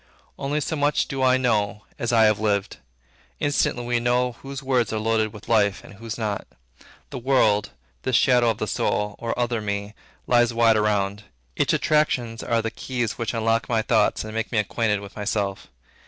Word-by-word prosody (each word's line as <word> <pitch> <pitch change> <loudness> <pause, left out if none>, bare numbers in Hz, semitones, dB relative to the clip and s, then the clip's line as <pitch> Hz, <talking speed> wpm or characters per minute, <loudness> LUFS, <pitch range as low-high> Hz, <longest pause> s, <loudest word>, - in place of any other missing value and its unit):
Only 140 +2 -1
so 160 - -2
much 145 0 +1
do 135 -2 -4
I 130 0 +4
know, 105 -4 0
as 120 - -1
I 115 -2 +5
have 105 -1 +4
lived. 105 -2 0 0.6
Instantly 140 -4 0
we 120 0 +1
know 125 +1 +1
whose 135 +3 -8
words 130 -3 +1
are 110 - -1
loaded 110 0 +1
with 105 0 -12
life, 100 -4 +2
and - - -13
whose 110 +2 -7
not. 105 -3 -3 0.6
The - - -5
world, 115 -5 +2 0.3
this - - 0
shadow 125 -2 +4
of 110 - -1
the 110 - -2
soul, 105 +2 -1
or 115 -1 -3
other 120 -2 0
me, 100 0 -3 0.3
lies 120 -1 +3
wide 115 -1 +5
around. 105 -1 0 0.3
Its - - +1
attractions 125 -7 +1
are 115 -1 0
the 115 - -2
keys 120 -4 -3
which 115 0 -2
unlock 115 +3 0
my 115 -2 +1
thoughts - - +2
and 110 0 -7
make 115 0 -3
me 120 - -1
acquainted 105 0 0
with 100 -1 -11
myself. 105 -2 -2
115 Hz, 185 wpm, -24 LUFS, 105-125 Hz, 0.6 s, I